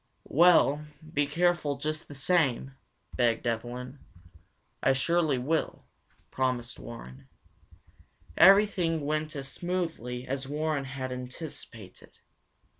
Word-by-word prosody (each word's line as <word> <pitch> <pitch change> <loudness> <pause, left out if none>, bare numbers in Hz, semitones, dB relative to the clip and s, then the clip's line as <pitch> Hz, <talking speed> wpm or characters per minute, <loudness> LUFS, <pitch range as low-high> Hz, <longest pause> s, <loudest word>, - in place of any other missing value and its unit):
"Well, 155 -2 +5 0.3
be 145 -2 +2
careful 165 -2 +1
just 155 +3 -3
the 145 - -10
same," 135 -3 +1 0.4
begged 120 -1 +1
Evelyn. 125 +3 -4 0.8
"I 135 - +4
surely 155 +1 +1
will," 155 +6 -2 0.5
promised 125 - -1
Warren. 65 +2 -10 1.1
Everything 190 -5 +5
went 155 +1 -2
as 135 -1 -5
smoothly 160 -7 -3
as 135 0 -3
Warren 150 -1 -1
had 130 -1 -5
anticipated. 125 - -8
140 Hz, 100 wpm, -29 LUFS, 125-160 Hz, 1.1 s, Well